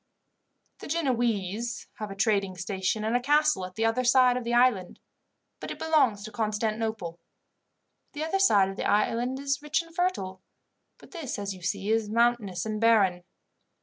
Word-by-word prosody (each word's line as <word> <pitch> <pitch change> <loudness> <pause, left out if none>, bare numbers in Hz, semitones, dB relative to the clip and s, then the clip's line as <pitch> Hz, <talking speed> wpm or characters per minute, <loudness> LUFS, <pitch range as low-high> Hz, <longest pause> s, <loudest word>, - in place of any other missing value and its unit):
"The - - -9
Genoese 235 - -1
have 215 -1 -4
a 195 - -7
trading 195 -3 0
station 190 +3 -2
and 220 +2 0
a - - +4
castle 295 -6 +2
at 185 - -17
the 225 - 0
other 225 +3 +1
side 250 0 +5
of 250 - -3
the 235 +1 -2
island, 240 -7 +2 0.6
but - - -7
it - - -6
belongs 275 -11 +2
to 215 - -8
Constantinople. 215 -4 -2 0.9
The 295 +1 -4
other 325 +5 -1
side 205 - +4
of 195 - -8
the - - -1
island 235 +5 +1
is 275 0 -2
rich 300 +1 0
and 330 0 -17
fertile, 265 - -2 0.6
but - - -18
this, 325 -8 -5
as 200 -1 -4
you 185 - -13
see, 195 +4 -2
is 220 -2 +1
mountainous 225 -5 +1
and 215 0 -3
barren. 200 -6 +3
225 Hz, 175 wpm, -27 LUFS, 200-255 Hz, 0.9 s, side